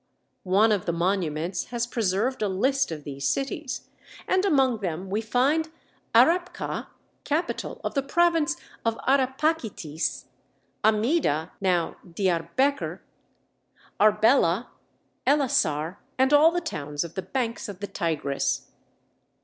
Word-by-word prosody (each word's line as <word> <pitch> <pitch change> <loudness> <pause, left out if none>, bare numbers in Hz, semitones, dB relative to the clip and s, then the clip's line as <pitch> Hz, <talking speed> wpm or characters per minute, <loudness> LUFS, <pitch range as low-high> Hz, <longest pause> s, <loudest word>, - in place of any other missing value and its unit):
One 210 +4 +5
of 205 -4 0
the 170 - +1
monuments 175 -1 -1
has 235 0 -2
preserved 230 +2 -1
a 210 - +2
list 260 +6 +1
of 150 -2 -6
these 140 -2 -4
cities, 275 0 -2 0.4
and 375 +1 +2
among 265 - +3
them 185 0 -4
we 210 +2 0
find 275 +8 +1 0.5
Arrapkha, 355 +2 +2 0.4
capital 310 +4 -2
of - - -2
the 275 - +1
province 330 +2 +2 0.3
of 230 0 0
Arrapachitis, 265 - 0 0.6
Amida 215 - +2
(now 180 -3 +1
Diarbekr), 185 - 0 1.0
Arbela, 215 -1 +4 0.6
Ellasar, 195 - +2 0.2
and 265 +2 +3
all 300 +2 +7
the 350 +1 -1
towns 150 - -3
of 170 -1 -8
the 190 - -3
banks 230 +4 -3
of 195 -2 -8
the 205 - -3
Tigris. 140 -7 -2
220 Hz, 115 wpm, -26 LUFS, 175-275 Hz, 1.0 s, all